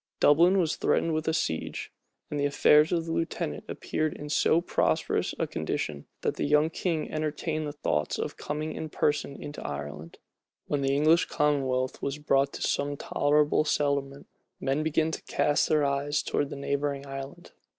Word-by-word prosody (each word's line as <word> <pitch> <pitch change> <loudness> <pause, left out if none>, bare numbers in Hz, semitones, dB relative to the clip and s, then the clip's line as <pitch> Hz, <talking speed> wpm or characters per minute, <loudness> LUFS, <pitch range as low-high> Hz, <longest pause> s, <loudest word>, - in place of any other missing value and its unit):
Dublin 170 +6 +5
was 165 -5 +1
threatened 165 - +1
with 155 0 -2
a - - +3
siege; 80 - -2 0.4
and 150 - -2
the 145 - +1
affairs 150 +2 +5
of 165 -2 0
the 165 - -4
lieutenant 75 - -2
appeared 155 -1 -2
in 150 - -7
so 155 +2 +3
prosperous 170 - 0
a - - 0
condition, 70 -2 -3
that - - -1
the - - -1
young 150 +2 +3
king 165 -2 -2
entertained 155 0 -2
thoughts 75 0 0
of - - -3
coming 155 +1 -4
in 160 - -5
person 150 -2 0
into 145 - -7
Ireland. 75 +3 -6 0.5
When 145 -1 -1
the 135 0 +1
English 155 +4 +4
commonwealth 135 -4 0
was 140 +1 -2
brought 140 -2 +2
to - - -5
some 145 0 0
tolerable 150 +2 +2
settlement, 140 -2 -1 0.3
men 135 +3 0
began 160 +1 +1
to - - -5
cast 145 0 +1
their 150 -2 +3
eyes 140 +1 0
towards 145 - -1
the - - -6
neighboring 140 0 -2
island. 135 0 -8
145 Hz, 170 wpm, -28 LUFS, 140-155 Hz, 0.5 s, Dublin